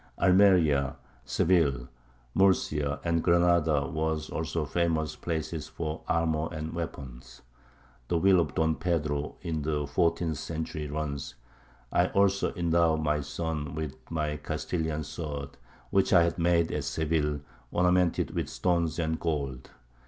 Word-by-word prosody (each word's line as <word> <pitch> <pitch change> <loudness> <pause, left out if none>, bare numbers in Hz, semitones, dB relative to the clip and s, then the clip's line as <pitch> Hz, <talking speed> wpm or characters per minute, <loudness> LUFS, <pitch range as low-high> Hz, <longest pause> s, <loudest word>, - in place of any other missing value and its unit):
Almeria, 90 -8 +4 0.3
Seville, 70 -9 +2 0.5
Murcia, 75 -7 +2
and 85 -1 +1
Granada 85 -5 +3
were 80 +2 -1
also 80 0 -2
famous 80 0 0
places 80 -2 -3
for 80 0 -5
armour 80 -2 +1
and 80 -1 -5
weapons. 65 -6 -7 0.6
The 85 - +1
will 95 +1 +5
of 80 -3 -1
Don 80 0 +2
Pedro 75 -4 -1
in 80 -2 -2
the 75 0 -1
fourteenth 80 +2 0
century 80 -1 -4
runs: 70 -2 -4 0.6
"I - - +4
also 100 0 +2
endow 85 -2 +3
my 75 -1 0
son 75 0 -4
with 80 -4 -4
my 75 -2 -1
Castilian 80 +1 -3
sword, 75 -2 -5 0.4
which - - +3
I 85 - +7
had 85 +1 -1
made 85 -1 +2
at 75 -2 -2
Seville, 75 0 0 0.3
ornamented 90 -1 +2
with - - -2
stones 85 -3 0
and 80 -1 -1
gold." 70 -6 -3
80 Hz, 130 wpm, -28 LUFS, 75-85 Hz, 0.6 s, I